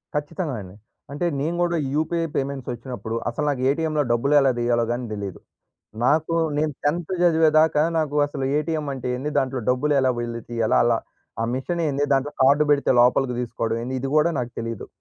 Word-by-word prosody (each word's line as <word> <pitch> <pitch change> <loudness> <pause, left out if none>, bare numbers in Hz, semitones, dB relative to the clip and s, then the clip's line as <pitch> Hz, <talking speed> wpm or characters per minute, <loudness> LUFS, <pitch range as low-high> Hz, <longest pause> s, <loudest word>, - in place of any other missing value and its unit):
ఖచ్చితంగా 150 0 -3
అండి. 95 0 -11 0.4
అంటే 145 +5 -2
నేను 160 +5 -1
కూడా 170 -1 0 0.2
యూపీఐ 165 +2 0
పేమెంట్స్ 135 -2 -3
వచ్చినప్పుడు, 120 -2 -6
అసలు 135 +5 -3
నాకు 130 -3 -2
ఏటీఎంలో 155 +1 0
డబ్బులు 130 +5 +1
ఎలా 135 -1 +4
తీయాలో 120 0 +2
కానీ 120 +1 -2
తెలీదు. 100 -3 -6 0.7
నాకు 155 +5 +2 0.2
నేను 150 0 0
10త్ 165 +4 -1
చదివేదాకా 160 -2 +4 0.2
నాకు 150 -2 -1
అసలు 140 -2 -5
ఏటీఎం 155 0 -2
అంటే 130 -2 -6
ఏంది, 140 +4 -3
దాంట్లో 130 -1 -1
డబ్బులు 130 +4 +2
ఎలా 130 -1 +3
వెళ్ళితీయాల? 115 -1 -2
అలా 120 -1 +3 0.5
ఆ - - +1
మిషన్ 170 +7 -2
ఏంది? 145 0 0
దాంట్లో 135 +2 +1
కార్డ్ 140 +3 +5
పెడితే 145 -1 +3
లోపలికి 125 +1 +3
తీసుకోవడం 115 -2 -2
ఏంది? 130 +2 -4
ఇది 135 - -3
కూడా 155 +2 +4
నాకు 125 -1 -3
తెలీదు. 115 -2 -5
140 Hz, 170 wpm, -23 LUFS, 120-155 Hz, 0.7 s, కార్డ్